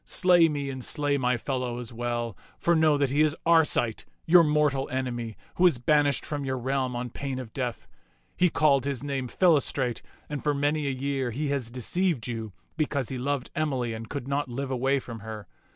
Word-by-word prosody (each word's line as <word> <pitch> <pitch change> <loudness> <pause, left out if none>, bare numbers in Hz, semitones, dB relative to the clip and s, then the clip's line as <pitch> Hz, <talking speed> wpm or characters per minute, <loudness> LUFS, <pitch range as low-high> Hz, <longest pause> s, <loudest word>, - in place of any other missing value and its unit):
Slay 175 -3 +5
me 140 -2 -3
and 130 -1 -6
slay 145 +1 0
my 125 -1 +1
fellow 125 -1 -3
as 120 -1 -6
well; 120 -2 -3 0.2
for 170 - +2
know 155 -2 +4
that 140 -2 +1
he 145 +2 +3
is 155 0 +3
Arcite, 160 -9 +3 0.2
your 170 +1 +7
mortal 150 -3 +1
enemy, 120 -4 -3 0.2
who 180 - +6
is 165 - +2
banished 145 +2 +2
from 145 -2 -3
your 130 -1 -2
realm 130 0 -1
on 120 0 -4
pain 135 -1 -4
of 125 -4 -7
death. 120 -4 -4 0.5
He 180 0 +3
called 145 -4 +3
his 140 -2 -3
name 135 -3 -2
Philostrate, 140 -6 +2 0.3
and 150 -2 -5
for 150 -1 +1
many 145 +1 0
a - - +1
year 135 -1 -1
he 140 +5 -2
has 135 -5 -1
deceived 130 +3 -1
you. 115 -3 -4 0.3
because 145 -5 -1
he 130 - -4
loved 140 0 -2
Emily 135 -7 -1
and 110 0 -7
could 140 -3 -5
not 140 0 -1
live 135 +2 -4
away 135 +2 +1
from 115 -4 -7
her. 110 -1 -7
135 Hz, 200 wpm, -27 LUFS, 125-150 Hz, 0.5 s, your